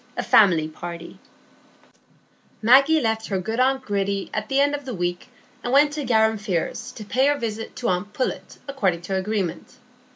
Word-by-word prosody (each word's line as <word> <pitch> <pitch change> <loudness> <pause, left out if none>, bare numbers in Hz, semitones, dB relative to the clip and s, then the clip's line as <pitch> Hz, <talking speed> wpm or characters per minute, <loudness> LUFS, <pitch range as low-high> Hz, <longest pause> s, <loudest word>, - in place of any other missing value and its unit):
A - - -1
Family 175 -7 +4
Party 170 +2 -9 1.4
Maggie 275 +8 +5
left 220 -3 -1
her 195 - -1
good 220 +6 -3
aunt 265 +1 +2
Gritty 200 -2 -2
at 215 0 -3
the 270 - +2
end 285 +1 +3
of 290 0 -4
the 255 -4 -5
week, 175 +2 -3 0.4
and 245 - -2
went 290 +2 +4
to 300 -1 -3
Garum 220 -3 +2
Firs 215 +4 -3
to 215 - -9
pay 260 +6 +2
her 290 0 +2
visit 225 -3 -5
to 240 - -3
aunt 185 +3 -1
Pullet 255 +4 -4
according 195 -12 -1
to 190 +2 -4
agreement. 190 0 -3
220 Hz, 175 wpm, -23 LUFS, 190-260 Hz, 1.4 s, Maggie